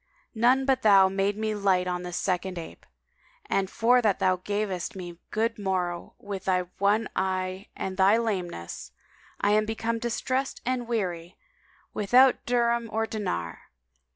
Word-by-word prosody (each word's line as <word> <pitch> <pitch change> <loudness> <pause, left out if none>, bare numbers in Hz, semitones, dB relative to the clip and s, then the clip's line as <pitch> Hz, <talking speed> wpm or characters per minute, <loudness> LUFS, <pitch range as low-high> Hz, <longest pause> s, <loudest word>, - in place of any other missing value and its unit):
None 250 +4 +3
but 265 -1 +2
thou 195 -3 +6
made 195 +1 0
me 215 0 -1
light 195 -3 +2
on 180 0 -2
this 180 -1 -5
second 185 0 -1
ape: 165 - -9 0.6
and 195 -1 0
for 245 +4 +3
that 210 -5 +2
thou 185 0 +2
gavest 205 +1 -3
me 175 -2 -8
good 225 +1 -1
morrow 180 -3 -2
with 200 -2 -7
thy 185 -1 +2 0.2
one 205 +3 +2
eye 185 0 -2
and 190 0 -4
thy 195 +3 +5
lameness, 185 - -4 0.5
[FN#189] - - +4
I - - +4
am 215 +1 +3
become 225 +1 -2
distressed 255 +3 -2
and 250 -1 -1
weary, 180 -7 -3 0.6
without 250 +5 +4
dirham 235 -1 +1
or 225 0 0
dinar." 85 - -4
200 Hz, 155 wpm, -27 LUFS, 185-230 Hz, 0.6 s, thou